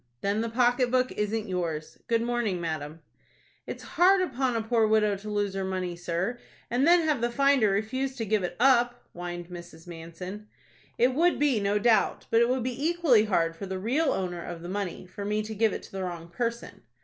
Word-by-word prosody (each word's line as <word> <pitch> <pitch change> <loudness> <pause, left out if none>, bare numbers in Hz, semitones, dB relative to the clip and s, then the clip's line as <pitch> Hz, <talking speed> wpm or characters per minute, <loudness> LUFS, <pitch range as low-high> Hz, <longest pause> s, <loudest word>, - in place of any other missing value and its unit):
"Then 200 +2 0
the 230 - -2
pocket 245 +1 +2
book 255 0 +2
isn't 210 +1 -2
yours. 170 -5 -3
Good 230 0 +1
morning, 235 -6 -1
madam." 160 -1 -4 0.7
"It's - - -6
hard 375 +3 +4
upon 260 -5 -1
a 225 - -1
poor 225 -1 +2
widow 215 -1 +3
to 210 +2 -8
lose 205 -2 -1
her 195 0 -2
money, 185 -2 -3
sir, 175 +7 -3 0.3
and 255 +5 +2
then 350 0 +6
have 300 -6 +1
the 240 - +1
finder 275 -3 +3
refuse 260 +7 -1
to 230 -4 -3
give 215 0 +1
it 180 - -3
up," 245 -1 +3
whined 175 0 -6
Mrs. 170 -2 -10
Manson. 175 +5 -8 0.5
"It 250 +2 +3
would 345 +6 +3
be, 280 -6 +2
no 200 +1 +1
doubt; 220 0 +2
but 230 - +5
it 235 - +3
would 255 -1 0
be 255 +2 -3
equally 315 -10 +4
hard 165 -5 +1
for 195 +4 -7
the 190 0 -3
real 270 +10 +1
owner 175 -2 -3
of 170 -1 -7
the 175 - -6
money 190 -2 -4
for 185 +3 -8
me 210 +1 -1
to 220 +1 -6
give 220 0 +2
it - - -5
to - - -13
the 195 - -5
wrong 170 -2 -6
person." 235 +5 -4
215 Hz, 210 wpm, -27 LUFS, 180-245 Hz, 0.7 s, then